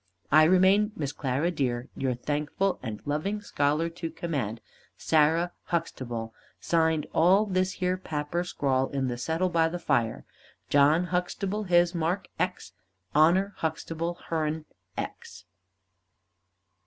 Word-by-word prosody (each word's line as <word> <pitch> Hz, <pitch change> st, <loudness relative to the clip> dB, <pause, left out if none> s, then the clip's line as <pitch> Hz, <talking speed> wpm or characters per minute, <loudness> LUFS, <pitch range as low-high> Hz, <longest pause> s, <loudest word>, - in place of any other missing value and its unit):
I 155 Hz, +2 st, +7 dB
remain, 190 Hz, +5 st, +4 dB
Miss 145 Hz, -3 st, -3 dB
Clara 140 Hz, +5 st, -1 dB
dear, 125 Hz, -6 st, -1 dB
your 130 Hz, -2 st, -1 dB
thankful 150 Hz, +9 st, -1 dB
and 110 Hz, -4 st, -5 dB
loving 155 Hz, +9 st, -1 dB
scholar 150 Hz, -4 st, 0 dB
to 170 Hz, 0 st, -5 dB
command, 145 Hz, -10 st, -3 dB, 0.4 s
SARAH 160 Hz, +3 st, +3 dB
HUXTABLE. 120 Hz, -9 st, -3 dB, 0.3 s
Signed 160 Hz, -2 st, +1 dB
all 190 Hz, +5 st, +5 dB
this 185 Hz, -1 st, 0 dB
here 185 Hz, 0 st, -1 dB
papper 155 Hz, +1 st, -2 dB
scrawl 135 Hz, -6 st, 0 dB
in 135 Hz, -2 st, -1 dB
the 120 Hz, -, -3 dB
settle 165 Hz, +8 st, 0 dB
by 165 Hz, -1 st, +2 dB
the 175 Hz, -, -4 dB
fire. 120 Hz, -9 st, 0 dB, 0.5 s
JOHN 145 Hz, +4 st, +5 dB
HUXTABLE 195 Hz, +3 st, -2 dB
his 175 Hz, -1 st, +4 dB
mark 170 Hz, +3 st, -1 dB
X 180 Hz, -, -2 dB, 0.4 s
HONOR 180 Hz, +7 st, +4 dB
HUXTABLE 165 Hz, +1 st, -3 dB, 0.2 s
hern 155 Hz, -1 st, -1 dB, 0.3 s
X." 90 Hz, -1 st, -7 dB
160 Hz, 125 wpm, -27 LUFS, 145-180 Hz, 0.5 s, I